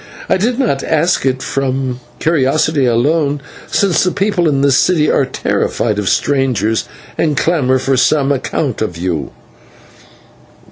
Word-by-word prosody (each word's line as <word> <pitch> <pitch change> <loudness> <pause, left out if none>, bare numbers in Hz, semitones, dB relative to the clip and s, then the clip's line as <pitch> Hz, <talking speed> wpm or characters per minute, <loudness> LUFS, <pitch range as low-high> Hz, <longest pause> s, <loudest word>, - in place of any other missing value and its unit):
I - - +2
did 235 +6 0
not 235 - 0
ask 160 -2 +1
it 130 0 -1
from 130 -2 -2 0.2
curiosity 150 -1 +1
alone, 145 +5 +1 0.3
since 195 -5 +1
the 185 - +2
people 195 -4 0
in 140 -2 0
this 140 -1 +3
city 155 -4 +2
are 135 - +1
terrified 110 -4 -1
of 100 - -1
strangers, 130 -6 0 0.3
and 150 -3 +1
clamour 140 -6 +2
for 135 +1 0
some 140 +2 +2
account 135 -2 -2
of 90 -6 -3
you." 85 -5 -3
140 Hz, 140 wpm, -15 LUFS, 130-160 Hz, 0.3 s, this